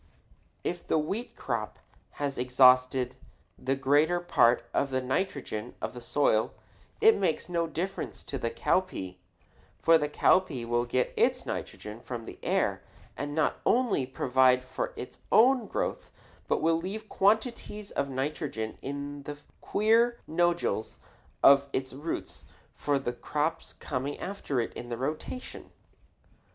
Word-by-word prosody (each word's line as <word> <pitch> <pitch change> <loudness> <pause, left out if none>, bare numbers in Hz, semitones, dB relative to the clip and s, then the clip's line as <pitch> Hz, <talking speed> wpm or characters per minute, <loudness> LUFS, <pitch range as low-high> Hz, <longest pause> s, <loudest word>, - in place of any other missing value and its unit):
If 175 0 -4
the - - +2
wheat 195 +11 -3
crop - - -3 0.4
has 140 -2 -3
exhausted 125 0 +4 0.4
the 130 +1 -1
greater 145 +6 +3
part 120 -8 +3
of 140 - +1
the 130 -1 0
nitrogen 130 - -3
of - - -4
the 125 - -8
soil, 120 -3 +1 0.4
it 445 0 +7
makes 170 -5 0
no 170 -1 0
difference 175 +5 -4
to 135 - -5
the 115 - -1
cowpea; 105 - -1 0.6
for 165 0 +5
the 150 -1 -1
cowpea 150 -5 +2
will 120 +1 +1
get 125 +1 0
its - - +2
nitrogen 105 +2 -6
from 120 -1 -6
the - - -10
air - - 0 0.3
and 145 0 -4
not 155 -2 +1
only 235 - +2
provide 130 0 +3
for - - -4
its - - -8
own 245 0 +5
growth - - -3 0.4
but - - 0
will 165 0 +4
leave 200 +6 -5
quantities 210 0 0
of 140 0 -1
nitrogen 135 -4 -3
in 140 +1 -5
the 145 +1 -7 0.2
queer 230 +3 +3
nodules 175 -8 0 0.5
of 140 0 +7
its 130 0 -2
roots 145 +5 -5 0.3
for 145 -1 0
the 130 -3 -3
crops 155 +6 -2
coming 140 +1 -4
after 185 -9 -3
it 115 - -2
in 120 - -8
the 120 - -3
rotation. 155 - -5
145 Hz, 140 wpm, -29 LUFS, 130-175 Hz, 0.6 s, it